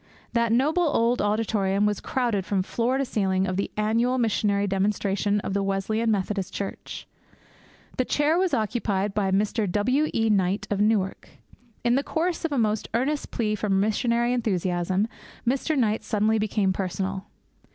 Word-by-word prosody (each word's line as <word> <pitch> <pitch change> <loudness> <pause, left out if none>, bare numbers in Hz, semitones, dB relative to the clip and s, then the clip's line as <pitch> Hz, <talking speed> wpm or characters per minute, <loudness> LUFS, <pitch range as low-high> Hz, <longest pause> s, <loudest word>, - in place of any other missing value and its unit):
That 235 -1 +2
noble 290 +9 +2
old 245 -4 +2
auditorium 205 -2 +1
was 210 -1 0
crowded 235 -7 -1
from 190 0 0
floor 240 +6 0
to 275 - 0
ceiling 190 -5 0
for 185 - -1
the 190 +2 -2
annual 230 +4 +1
missionary 210 -3 +1
demonstration 200 +1 0
of 195 - -4
the 200 - +1
Wesleyan 195 +4 0
Methodist 195 -2 -1
Church. 200 - -6 0.9
The 255 - +2
chair 295 +4 +2
was 375 -2 +1
occupied 210 -3 -1
by 200 -2 0
Mr. 205 +1 0
W. 255 +10 +1
E. 225 0 +1
Knight, 195 0 +1
of 205 0 +1
Newark. 205 -3 0 0.5
In 240 0 +3
the 275 +3 +2
course 335 +3 -1
of 330 - -1
a 280 - 0
most 215 -2 0
earnest 280 +5 -1
plea 215 -3 -1
for 210 0 -2
missionary 235 +5 +1
enthusiasm, 185 -3 0 0.4
Mr. 275 +5 +1
Knight 220 -3 +1
suddenly 220 0 +1
became 210 -2 +1
personal. 190 +1 -3
210 Hz, 160 wpm, -25 LUFS, 195-235 Hz, 0.9 s, In